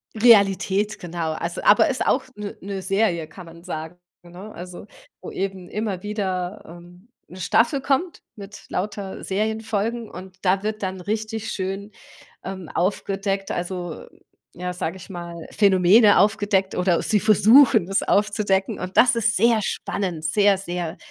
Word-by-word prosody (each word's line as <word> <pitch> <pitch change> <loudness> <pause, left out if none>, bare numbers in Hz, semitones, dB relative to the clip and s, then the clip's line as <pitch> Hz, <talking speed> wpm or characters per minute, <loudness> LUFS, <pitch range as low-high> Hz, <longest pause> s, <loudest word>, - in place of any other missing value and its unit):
Realität 205 -2 +4
genau, 170 -2 -3
also 170 +2 -4
aber 205 - +5
ist 260 - -1
auch 260 - +2
'ne 210 -1 -7
'ne 195 0 -5
Serie 190 -4 0
kann 180 +3 -12
man 165 0 -14
sagen, 160 -1 -6 0.3
ne? 180 +5 -11
Also, 180 +3 -9 0.3
wo - - -7
eben 190 -2 -4
immer 210 -3 -3
wieder, 195 -2 -3
ähm, 175 +5 -15 0.2
'ne 185 - -12
Staffel 230 - +2
kommt 285 +6 -1
mit 205 0 -11
lauter 200 0 -4
Serienfolgen 220 +2 -2
und 185 0 -11
da 190 +1 +2
wird 215 0 -3
dann 190 0 -3
richtig 215 +2 -3
schön, 195 +2 -4 0.5
ähm, 190 -3 -7
aufgedeckt 195 +2 -1
also, 175 -2 -5 0.5
ja 180 +1 -4
sage 175 -1 -4
ich 185 - -13
mal 170 -1 -7 0.2
Phänomene 200 +2 +5
aufgedeckt 200 -1 +2
oder 180 -2 +1
sie 210 - +2
versuchen 215 0 +5
es 195 - +1
aufzudecken 200 -2 +1
und 185 0 -6
das 245 0 +6
ist 230 0 +1
sehr 230 +1 +3
spannend 180 -5 -3
sehr, 200 +4 +3
sehr 175 -2 -5
195 Hz, 150 wpm, -23 LUFS, 180-215 Hz, 0.5 s, das